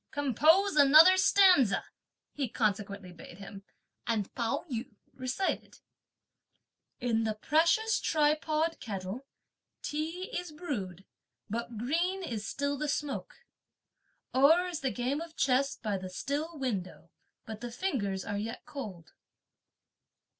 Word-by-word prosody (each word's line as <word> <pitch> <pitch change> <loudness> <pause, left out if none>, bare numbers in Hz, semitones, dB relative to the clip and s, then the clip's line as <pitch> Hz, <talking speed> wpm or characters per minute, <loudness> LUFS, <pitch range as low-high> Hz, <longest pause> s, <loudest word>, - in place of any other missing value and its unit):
Compose 305 - +3
another 310 +6 +8
stanza," 370 - +5 0.5
he 275 -5 -2
consequently 200 -4 -2
bade 175 0 -12
him; 195 0 -10 0.4
and 215 -4 -1
Pao 230 -2 -2
yü 235 -4 -5 0.2
recited: 255 +9 -3 1.2
In 230 -2 +1
the 220 -1 -1
precious 335 - +2
tripod 310 +1 +1
kettle, 200 +5 -6 0.6
tea 325 +5 -4
is 355 -2 -4
brewed, 205 - -5 0.5
but 235 0 -4
green 340 - -1
is 220 - -4
still 285 0 -2
the 300 - -2
smoke! 295 - -4 0.9
O'er 310 +7 +5
is 345 -4 -4
the 270 - -1
game 255 +5 -2
of 335 -1 -9
chess 270 +1 +2
by 210 -3 -3
the 185 0 -7
still 295 - -3
window, 195 - -4 0.3
but 220 0 -8
the 240 - -5
fingers 225 - -2
are 205 - -3
yet 225 +2 -6
cold. 200 - -8
265 Hz, 120 wpm, -30 LUFS, 215-315 Hz, 1.2 s, another